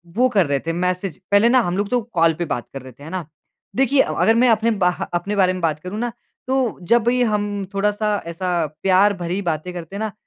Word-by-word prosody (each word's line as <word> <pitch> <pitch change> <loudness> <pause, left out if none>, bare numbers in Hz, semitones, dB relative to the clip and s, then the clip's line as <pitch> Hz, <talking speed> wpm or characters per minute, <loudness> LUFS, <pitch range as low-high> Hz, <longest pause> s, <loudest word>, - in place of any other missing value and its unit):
वो 250 +3 +4
कर 195 -5 +4
रहे 140 -1 0
थे 165 - 0
मैसेज। 180 +1 -2
पहले 205 +4 +5
ना 255 +1 +5
हम 175 -3 -2
लोग 205 0 -1
तो 245 -1 +1
कॉल 165 -1 +4
पे 175 - 0
बात 135 -5 -4
कर 135 - -6
रहे 130 +1 -11
थे। 140 - -16
है 160 - -8
ना? 185 -2 -4 0.5
देखिए 270 +1 +3
अ, - - -1
अगर 225 +1 +3
मैं 245 +1 +4
अपने 225 +1 +3
ब 180 - +4 0.2
अपने 185 +4 -1
बारे 185 -2 +3
में 185 - -5
बात 155 -2 0
करूँ 185 +6 -6
ना 240 0 -2 0.4
तो 260 -3 0
जब 235 0 +4
ये 250 0 +2
हम 205 -2 -1
थोड़ा-सा 210 +1 0
ऐसा 170 0 -1 0.2
प्यार 195 +2 +4
भरी 180 +2 -3
बातें 170 -1 -2
करते 175 +2 -8
हैं - - -4
ना, 215 - -2
195 Hz, 245 wpm, -21 LUFS, 175-220 Hz, 0.5 s, पहले